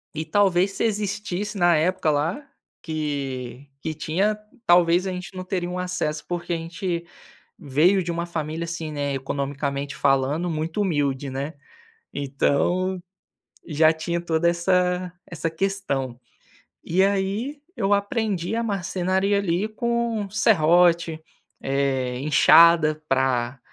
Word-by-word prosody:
E, 155 +1 -3
talvez, 195 -1 +2
se 195 - -3
existisse, 210 -1 -2
na 175 -2 +4
época 170 +2 +1
lá, 155 - 0 0.4
que 140 -4 -4
que 160 - -3
tinha, 185 +7 0 0.3
talvez, 175 +1 +4
a - - -2
gente 180 +1 -7
não 185 - -5
teria 180 -2 -2
um 180 - -4
acesso, 180 -4 -2
porque 175 0 -4
a - - 0
gente 170 +1 -4 0.5
veio 170 +4 +3
de 170 - -2
uma 170 0 -2
família, 160 -1 -4
assim, 165 -2 -5
né, 145 -1 -2
economicamente 140 +1 -3
falando, 140 +5 +1
muito 160 +4 -2
humilde, 145 -6 0
né. 140 +4 -4 0.6
Então, 160 +7 0 0.6
já 155 0 +4
tinha 170 +2 -3
toda 170 0 +1
essa 180 +1 +1
essa 165 -1 -3
questão. 160 -9 -2 0.7
E 180 +3 +2
aí, 200 +8 0 0.2
eu 200 -4 0
aprendi 200 -2 -1
a 230 - 0
marcenaria, 195 -1 0
ali, 190 0 0
com 235 -2 -1
serrote, 170 -5 +3 0.4
eh, 135 -2 -1
inchada 155 +2 +5
pra 130 -1 +1
170 Hz, 125 wpm, -24 LUFS, 150-190 Hz, 0.7 s, inchada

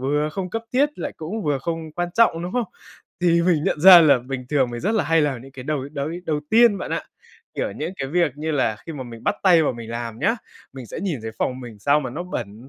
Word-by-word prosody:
vừa 145 +3 0
không 185 0 -4
cấp 225 +3 -3
thiết 290 +3 +1
lại 290 - -4
cũng 190 +8 -5
vừa 145 -4 0
không 160 +2 -5
quan 175 +2 -2
trọng, 225 -8 +3
đúng 175 +2 -5
không? 245 -1 0 0.6
Thì 170 -1 +3
mình 170 -4 +2
nhận 150 - 0
ra 180 0 +10
là 145 -5 +5
bình 125 0 -6
thường 135 -4 +1
mình 120 0 -5
rất 210 +6 0
là 215 - +1
hay 165 +2 +3
làm 135 -5 -1
những 135 +1 -14
cái 130 -1 -9
đầu 140 -1 -3
đầu 140 -1 -3 0.2
đầu 150 -2 0
tiên 230 -2 +5
bạn - - -6
ạ, - - -1 0.5
kiểu, - - -2
những - - -4
cái 135 - -4
việc 170 -1 +1
như 155 +2 -3
là 130 -7 +1
khi 165 - -5
mà 145 -4 -6
mình 115 -2 -11
bắt - - +1
tay 175 -4 +6
vào 145 - +1
mình 115 -2 -9
làm 115 -1 -5
nhá, 225 - +1 0.4
mình 130 -2 -9
sẽ - - -7
nhìn 175 -8 -2
thấy 110 - -4
phòng 130 0 -1
mình 120 -4 -10
sao 145 +7 +3
mà 130 -4 -5
nó 155 +8 -5
bẩn, 120 - -7
150 Hz, 270 wpm, -22 LUFS, 130-175 Hz, 0.6 s, ra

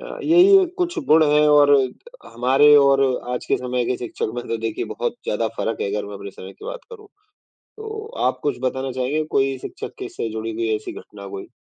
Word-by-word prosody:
अ, - - -8
यही 370 +4 +6
कुछ 355 0 -1
गुण 155 +1 +6
हैं 150 0 +4
और 145 -1 +6 0.6
हमारे 135 +5 +5
और 140 -1 +5 0.3
आज 125 - -4
के - - +2
समय 125 -1 -2
के 125 - 0
शिक्षक 115 -2 -4
में 120 0 -5
तो 115 - -1
देखिए 115 -1 -3
बहुत - - -3
ज़्यादा 110 +1 -1
फ़र्क 115 - -2
है, 100 - -1
अगर 105 -1 -2
मैं 105 - -8
अपने 100 0 -8
समय 95 0 -11
की - - -15
बात - - -6
करूँ, 425 -3 -12 0.7
तो 435 0 -7 0.2
आप - - 0
कुछ 145 -4 -1
बताना 130 0 -2
चाहेंगे 130 +5 -1
कोई 135 0 +2
शिक्षक - - -8
के - - -5
से 115 - -4
जुड़ी 110 +1 -4
हुई 115 0 -2
ऐसी 110 - -7
घटना 100 -1 -11
कोई? 95 0 -7
130 Hz, 210 wpm, -21 LUFS, 115-155 Hz, 0.7 s, यही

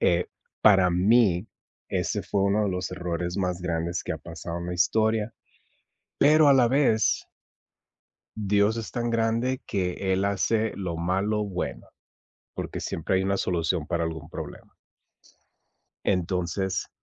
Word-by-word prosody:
eh, 85 0 +2 0.3
para 95 -4 +6
mí, 95 +1 +3 0.4
ese - - -1
fue 100 - -1
uno 100 +2 +2
de 100 - 0
los 90 0 -3
errores 90 -1 -3
más 90 -2 -1
grandes 85 0 -2
que - - -3
ha - - -5
pasado 85 +1 -7
en 85 - -6
la 90 - -3
historia, 110 +4 +1 0.9
pero 155 +1 +6
a 140 - +7
la 125 -3 +5
vez 125 -5 +2 1.1
Dios 105 +1 +2
es 115 - -5
tan 120 -1 -2
grande 115 +3 0
que 95 -1 -1
él 95 +1 +1
hace 105 +3 +1
lo 90 -4 -4
malo 95 +5 0
bueno, 95 -3 -4 0.7
porque - - -5
siempre 85 +3 -1
hay 95 - +1
una 100 0 +1
solución 85 -3 -1
para 85 -1 0
algún 80 -2 -6
problema - - -8 1.3
entonces, 90 0 -1
95 Hz, 140 wpm, -26 LUFS, 90-110 Hz, 1.3 s, a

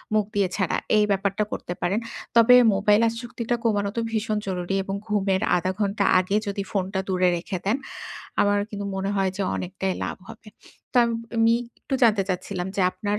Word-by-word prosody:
মুখ 210 -1 +3
দিয়ে 200 -2 +3
ছাড়া। 190 -4 0 0.2
এই 210 - +5
ব্যাপারটা 200 +1 0
করতে 175 - -4
পারেন। 200 +5 +1 0.4
তবে 235 +2 +8 0.2
মোবাইল 205 +2 +4
আসক্তিটা 235 +1 -3
কমানো 205 -3 +1
তো - - +2
ভীষণ 215 -1 -1
জরুরি 180 0 -2
এবং 195 +1 -4
ঘুমের 195 -2 +1 0.2
০.৫ 185 +2 -1
ঘন্টা 200 0 0 0.2
আগে 185 +3 -1
যদি 200 0 -2
ফোনটা 190 -1 -1
দূরে 185 -1 +3
রেখে 185 +3 -4
দেন। 215 +6 +2 0.6
আমার 205 0 +3
কিন্তু 205 -1 -5
মনে 195 +1 -1
হয় 190 -1 +1
যে, 200 - -1
অনেকটাই 190 +1 -3
লাভ - - -4
হবে। 225 -1 -12 0.4
তো - - -3
আম 235 - -1 0.3
আমি 225 0 +5 0.3
একটু 270 - -4
জানতে 215 -4 +5
চাচ্ছিলাম 185 0 -3
যে, 200 - +1
আপনার 205 +2 -2
200 Hz, 180 wpm, -24 LUFS, 190-215 Hz, 0.6 s, তবে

